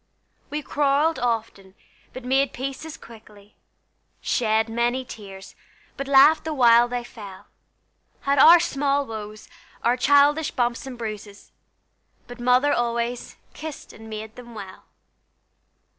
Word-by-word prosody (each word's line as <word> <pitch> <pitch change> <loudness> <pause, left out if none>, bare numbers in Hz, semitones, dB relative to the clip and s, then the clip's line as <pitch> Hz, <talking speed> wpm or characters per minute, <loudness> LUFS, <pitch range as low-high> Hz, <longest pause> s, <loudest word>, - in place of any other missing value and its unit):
We 300 0 -4
quarrelled 290 +3 +1
often, 225 -5 -3 0.4
but 255 -1 -10
made 270 +1 +1
peace 275 +4 -6
as 320 - -9
quickly, 210 -3 -16 0.6
Shed 220 -2 0
many 240 +3 -1
tears, 195 -4 -11 0.4
but 275 - -6
laughed 280 +3 +6
the 315 -1 -4
while 240 -2 +5
they 245 0 -4
fell, 205 -6 -12 0.8
Had 280 0 +1
our 335 +5 +9
small 285 -3 0
woes, 215 -2 -8 0.4
our 240 +1 +3
childish 285 +4 +3
bumps 245 -2 -2
and 255 -2 -8
bruises, 210 -3 -8 0.7
But 245 0 -12
Mother 250 +4 +3
always 235 0 -2 0.2
"kissed 310 -2 -9
and 220 +1 -13
made 220 +1 -8
them 240 -2 -12
well." 195 -3 -10
245 Hz, 130 wpm, -23 LUFS, 220-275 Hz, 0.8 s, our